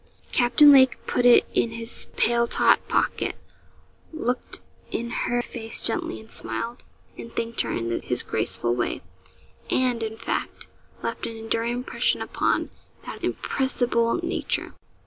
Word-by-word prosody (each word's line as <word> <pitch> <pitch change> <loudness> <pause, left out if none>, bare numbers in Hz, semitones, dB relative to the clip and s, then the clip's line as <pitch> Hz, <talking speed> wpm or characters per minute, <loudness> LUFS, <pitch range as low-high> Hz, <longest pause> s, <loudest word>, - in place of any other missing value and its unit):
Captain 260 +4 +6
Lake 260 -2 +6
put 245 - +2
it 245 - +7
in 235 - +2
his 230 +1 -6
paletot 235 0 +4
pocket, - - 0 0.8
looked 250 -6 -3 0.3
in 235 0 -3
her 240 0 0
face 225 -2 -5
gently, 350 -1 -1
and 220 - -15
smiled, 235 +2 -5 0.4
and 230 - -8
thanked 230 0 0
her - - -2
in 115 0 -2
his 125 - -1
graceful 120 +1 0
way 120 0 -2 0.7
and, 250 -2 +1
in 220 0 -4
fact, - - -4 0.4
left 230 - -3
an 230 - -7
enduring 225 +1 -1
impression 250 +2 0
upon - - 0 0.3
that - - -8
impressible 245 -3 0
nature. - - -2
235 Hz, 130 wpm, -25 LUFS, 225-245 Hz, 0.8 s, it